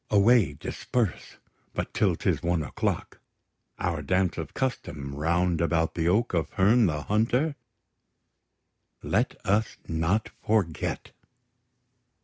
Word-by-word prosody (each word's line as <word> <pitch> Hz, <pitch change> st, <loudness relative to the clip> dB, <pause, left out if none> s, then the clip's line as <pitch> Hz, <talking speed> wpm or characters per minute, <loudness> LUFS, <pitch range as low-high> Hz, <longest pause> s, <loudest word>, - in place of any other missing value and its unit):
Away; 105 Hz, -3 st, +5 dB
disperse: 110 Hz, -, -3 dB, 0.4 s
But -, -, -3 dB
till -, -, +2 dB
'tis -, -, 0 dB
one 85 Hz, -2 st, 0 dB
o'clock, 70 Hz, -, -3 dB, 0.6 s
Our -, -, -1 dB
dance 90 Hz, -2 st, +1 dB
of 80 Hz, -, -6 dB
custom, 75 Hz, -, -3 dB
round 85 Hz, +3 st, +1 dB
about 80 Hz, -1 st, +1 dB
the 80 Hz, -1 st, -1 dB
oak 105 Hz, +6 st, +2 dB
Of 80 Hz, -4 st, 0 dB
Herne 105 Hz, +3 st, +4 dB
the 75 Hz, -3 st, -2 dB
Hunter, 125 Hz, +8 st, +1 dB, 1.5 s
let -, -, +1 dB
us 105 Hz, +3 st, +1 dB
not 85 Hz, +7 st, 0 dB
forget! 100 Hz, -8 st, -1 dB
90 Hz, 115 wpm, -27 LUFS, 80-110 Hz, 1.5 s, Away